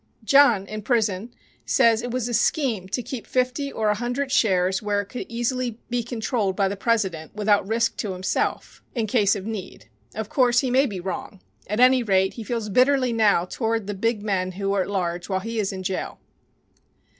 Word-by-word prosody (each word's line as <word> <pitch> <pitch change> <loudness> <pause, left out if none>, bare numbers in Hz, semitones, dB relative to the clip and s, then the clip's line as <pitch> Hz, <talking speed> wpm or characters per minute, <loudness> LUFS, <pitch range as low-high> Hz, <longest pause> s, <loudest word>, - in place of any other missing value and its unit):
John, 240 -5 +5
in 215 +1 -6
prison, 220 -1 0 0.3
says 230 -4 +3
it 245 - -4
was 245 -1 -2
a 240 - -4
scheme 235 - +1
to 245 +5 -2
keep 245 -2 -7
fifty 255 +2 -1
or 215 -1 0
a - - +4
hundred 245 +5 -3
shares 190 -4 +2
where 205 -1 0
it - - -9
could 250 - -6
easily 240 0 -2
be 245 0 +1
controlled 225 -4 -2
by 195 0 +2
the 200 - -3
president, 195 -8 -1
without 205 -2 +2
risk 230 +1 0
to 205 -4 -3
himself, 185 +1 -2
in 230 -3 0
case 210 -3 +2
of 195 -1 -6
need. 195 - -7 0.3
Of 220 -1 -4
course, 245 0 +3
he 260 -3 -1
may 270 +3 +4
be 200 -5 -5
wrong. 190 +2 -6 0.3
At 210 +3 -2
any 255 +1 +6
rate, 190 -3 +2
he 230 - -7
feels 230 -1 -3
bitterly 255 +2 +3
now 210 -6 +3
toward 225 +2 -2
the 205 - -3
big 215 +1 -1
men 185 -3 -1
who 195 +1 -2
are 200 - +2
at 185 - -3
large 175 -2 -2
while 190 -1 0
he 225 +2 -4
is 200 -2 0
in 190 -1 -6
jail. 185 0 -3
220 Hz, 200 wpm, -24 LUFS, 195-245 Hz, 0.3 s, any